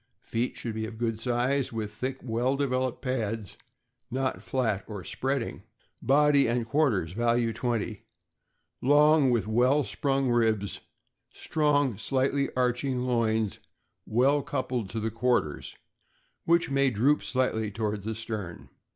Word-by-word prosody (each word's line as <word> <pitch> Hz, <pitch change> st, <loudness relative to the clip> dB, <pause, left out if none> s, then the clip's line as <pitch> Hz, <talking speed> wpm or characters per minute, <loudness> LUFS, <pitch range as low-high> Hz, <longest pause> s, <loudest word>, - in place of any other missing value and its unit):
Feet 115 Hz, +2 st, -2 dB
should 115 Hz, -, -4 dB
be 110 Hz, 0 st, -3 dB
of 110 Hz, 0 st, -9 dB
good 115 Hz, -1 st, -1 dB
size, 125 Hz, +3 st, 0 dB
with 110 Hz, -2 st, -4 dB
thick, 130 Hz, +4 st, -3 dB
well 120 Hz, +3 st, 0 dB
developed 130 Hz, -2 st, -1 dB
pads, 115 Hz, -6 st, -2 dB, 0.5 s
not 130 Hz, +1 st, -2 dB
flat 115 Hz, -7 st, -1 dB
or 105 Hz, -4 st, -7 dB
spreading. 135 Hz, +3 st, -2 dB, 0.4 s
Body 145 Hz, +1 st, +4 dB
and 120 Hz, 0 st, 0 dB
quarters 115 Hz, -, +1 dB
(value 115 Hz, +2 st, +1 dB
20) 115 Hz, -3 st, -2 dB, 0.8 s
long, 145 Hz, +1 st, +5 dB
with 120 Hz, -4 st, +1 dB
well 125 Hz, +7 st, +3 dB
sprung 135 Hz, -1 st, 0 dB
ribs, 110 Hz, -4 st, +1 dB, 0.5 s
strong, 145 Hz, -7 st, +1 dB
slightly 135 Hz, +3 st, 0 dB
arching 125 Hz, +1 st, 0 dB
loins, 110 Hz, -4 st, 0 dB, 0.5 s
well 135 Hz, +6 st, +3 dB
coupled 125 Hz, -5 st, -3 dB
to 110 Hz, -, -4 dB
the 110 Hz, +1 st, -2 dB
quarters, 115 Hz, -, -1 dB, 0.7 s
which 170 Hz, -3 st, +3 dB
may 135 Hz, 0 st, +3 dB
droop 130 Hz, +6 st, +2 dB
slightly 120 Hz, -4 st, 0 dB
toward 105 Hz, 0 st, -3 dB
the 110 Hz, +2 st, -4 dB
stern. 110 Hz, -6 st, -6 dB
120 Hz, 130 wpm, -28 LUFS, 110-135 Hz, 0.8 s, long